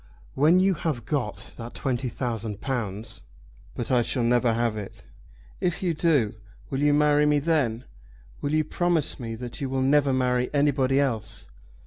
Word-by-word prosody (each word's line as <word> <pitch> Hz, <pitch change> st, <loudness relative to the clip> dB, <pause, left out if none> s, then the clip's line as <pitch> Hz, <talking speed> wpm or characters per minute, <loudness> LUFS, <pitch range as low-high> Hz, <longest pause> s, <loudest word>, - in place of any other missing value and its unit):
When 155 Hz, +6 st, +4 dB
you 190 Hz, +1 st, +4 dB
have 150 Hz, -8 st, -3 dB
got 130 Hz, -8 st, -3 dB
that 115 Hz, 0 st, -8 dB
twenty 130 Hz, -1 st, -1 dB
thousand 115 Hz, -5 st, -4 dB
pounds 110 Hz, -5 st, -4 dB, 0.3 s
?" -, -, -25 dB
"But 120 Hz, -, -4 dB
I 125 Hz, -2 st, +4 dB
shall 120 Hz, +1 st, -1 dB
never 120 Hz, 0 st, +3 dB
have 115 Hz, -1 st, 0 dB
it." 105 Hz, -2 st, -8 dB, 0.6 s
"If 180 Hz, +1 st, -1 dB
you 175 Hz, -2 st, +1 dB
do, 150 Hz, -9 st, +2 dB, 0.4 s
will 135 Hz, -, -1 dB
you 145 Hz, 0 st, +4 dB
marry 150 Hz, 0 st, +4 dB
me 150 Hz, 0 st, +4 dB
then? 140 Hz, -7 st, 0 dB, 0.6 s
Will 145 Hz, -, -1 dB
you 155 Hz, -, +3 dB
promise 170 Hz, -1 st, 0 dB
me 115 Hz, -2 st, -5 dB
that 120 Hz, +3 st, -7 dB
you 135 Hz, -, -2 dB
will 130 Hz, 0 st, 0 dB
never 140 Hz, 0 st, +3 dB
marry 125 Hz, -1 st, +1 dB
anybody 140 Hz, -2 st, +2 dB
else?" 115 Hz, -7 st, -2 dB
130 Hz, 170 wpm, -26 LUFS, 115-150 Hz, 0.6 s, When